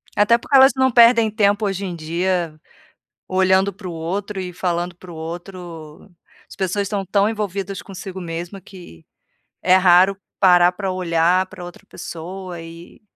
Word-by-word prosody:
Até 210 Hz, +3 st, +4 dB
porque 275 Hz, +4 st, -2 dB
elas 265 Hz, 0 st, +7 dB
não 260 Hz, 0 st, +2 dB
perdem 230 Hz, -1 st, +6 dB
tempo 210 Hz, 0 st, +1 dB
hoje 195 Hz, 0 st, -2 dB
em 180 Hz, -2 st, -5 dB
dia, 170 Hz, 0 st, -2 dB, 0.7 s
olhando 190 Hz, +1 st, +2 dB
pro 185 Hz, -1 st, -8 dB
outro 190 Hz, +5 st, -4 dB
e 180 Hz, -1 st, -5 dB
falando 175 Hz, 0 st, -2 dB
pro 175 Hz, 0 st, -12 dB
outro, 170 Hz, 0 st, -9 dB, 0.4 s
as -, -, -12 dB
pessoas 195 Hz, +1 st, -1 dB
estão 200 Hz, 0 st, -3 dB
tão 200 Hz, +2 st, +2 dB
envolvidas 200 Hz, -3 st, -4 dB
consigo 190 Hz, -1 st, -8 dB
mesma 175 Hz, +3 st, -6 dB
que, 175 Hz, -, -14 dB, 0.6 s
é 185 Hz, 0 st, +4 dB
raro 185 Hz, +1 st, +5 dB, 0.2 s
parar 180 Hz, -2 st, +5 dB
pra 190 Hz, +1 st, -4 dB
olhar 180 Hz, 0 st, +1 dB
pra 185 Hz, -2 st, -11 dB
outra 175 Hz, -, -12 dB
pessoa 175 Hz, +1 st, -8 dB
e 165 Hz, +1 st, -13 dB
185 Hz, 150 wpm, -20 LUFS, 175-200 Hz, 0.7 s, elas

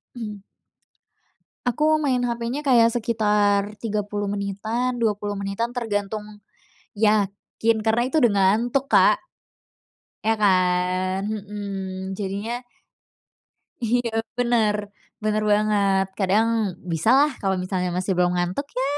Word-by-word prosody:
Mhm. 210 Hz, -4 st, -6 dB, 1.3 s
Aku 310 Hz, +5 st, +2 dB
main 260 Hz, -4 st, +1 dB
HP-nya 240 Hz, +4 st, -2 dB
kayak 240 Hz, -4 st, +5 dB
sekitar 210 Hz, -3 st, +1 dB
30 205 Hz, -1 st, -2 dB
menitan, 215 Hz, +5 st, -2 dB
20 210 Hz, -3 st, -1 dB
menitan, 200 Hz, +5 st, -3 dB
tergantung 210 Hz, -2 st, -3 dB, 0.5 s
yakin, 215 Hz, +1 st, +1 dB
karena 220 Hz, +2 st, +2 dB
itu 300 Hz, +4 st, +1 dB
udah 240 Hz, -4 st, +5 dB
ngantuk 230 Hz, +8 st, +2 dB
Kak. -, -, +5 dB, 1.0 s
Iya 225 Hz, +1 st, +2 dB
kan? 185 Hz, -1 st, +1 dB
Mhm. 195 Hz, -2 st, -5 dB
Jadinya 205 Hz, +4 st, -3 dB, 1.2 s
Iya 235 Hz, 0 st, +1 dB, 0.3 s
bener. 235 Hz, -4 st, +2 dB, 0.5 s
Bener 215 Hz, 0 st, +1 dB
banget. 205 Hz, -2 st, +2 dB
Kadang, 205 Hz, +4 st, +3 dB, 0.4 s
bisa 165 Hz, +6 st, 0 dB
lah 295 Hz, +1 st, +4 dB
kalau 195 Hz, -1 st, +1 dB
misalnya 185 Hz, -1 st, -1 dB
masih 185 Hz, +1 st, -1 dB
belum 180 Hz, 0 st, +2 dB
ngantuk, 180 Hz, +11 st, -2 dB
ya 260 Hz, -, +1 dB
210 Hz, 110 wpm, -23 LUFS, 195-235 Hz, 1.3 s, kayak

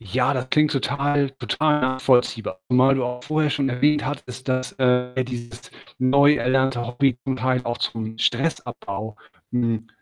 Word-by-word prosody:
Ja, 125 Hz, +6 st, 0 dB
das 130 Hz, 0 st, -3 dB
klingt 150 Hz, 0 st, +3 dB
total 140 Hz, +1 st, 0 dB
total 150 Hz, +4 st, 0 dB
nachvollziehbar. 125 Hz, -6 st, +1 dB
Zumal 130 Hz, +2 st, +4 dB
du 130 Hz, -, -1 dB
auch 125 Hz, 0 st, -5 dB
vorher 155 Hz, +1 st, 0 dB
schon 140 Hz, -2 st, 0 dB
erwähnt 145 Hz, +4 st, +2 dB
hattest, 130 Hz, -3 st, -6 dB
dass, 130 Hz, 0 st, -1 dB
äh, 125 Hz, 0 st, +1 dB
dieses 120 Hz, -2 st, -8 dB, 0.3 s
neu 140 Hz, +3 st, +5 dB
erlernte 130 Hz, 0 st, +1 dB
Hobby 125 Hz, +1 st, +1 dB
zum 130 Hz, -1 st, -1 dB
Teil 130 Hz, -1 st, 0 dB
auch 120 Hz, -1 st, -3 dB
zum 110 Hz, -1 st, -4 dB
Stressabbau, 115 Hz, -6 st, -2 dB, 0.4 s
hm, 115 Hz, -2 st, -1 dB
130 Hz, 150 wpm, -23 LUFS, 120-135 Hz, 0.4 s, neu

